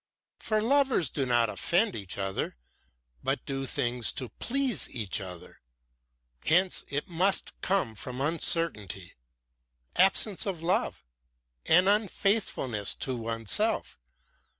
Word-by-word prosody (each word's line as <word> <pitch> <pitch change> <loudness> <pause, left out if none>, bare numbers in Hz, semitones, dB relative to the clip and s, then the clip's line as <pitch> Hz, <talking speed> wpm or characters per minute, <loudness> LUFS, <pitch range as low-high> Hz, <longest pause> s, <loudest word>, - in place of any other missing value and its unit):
For 215 -1 0
lovers 265 - +2
do 135 -3 -1
not 120 -1 +3
offend 180 - +1
each 100 -4 -5
other, 95 -9 -2 0.7
but - - -1
do 135 -1 -3
things 120 -1 +1
to 125 - -4
please 255 - 0
each 105 -4 -2
other. 90 -3 -9 0.8
Hence 180 +3 +2
it 145 +4 -3
must 185 +2 +1
come 185 -12 +1
from 125 +4 -5
uncertainty, 140 - 0 0.8
absence 195 +2 +3
of 175 -4 -3
love, 175 - 0 0.6
and 180 +4 +5
unfaithfulness 195 - +1
to 130 - -2
oneself. 115 -3 -1
145 Hz, 110 wpm, -28 LUFS, -, 0.8 s, and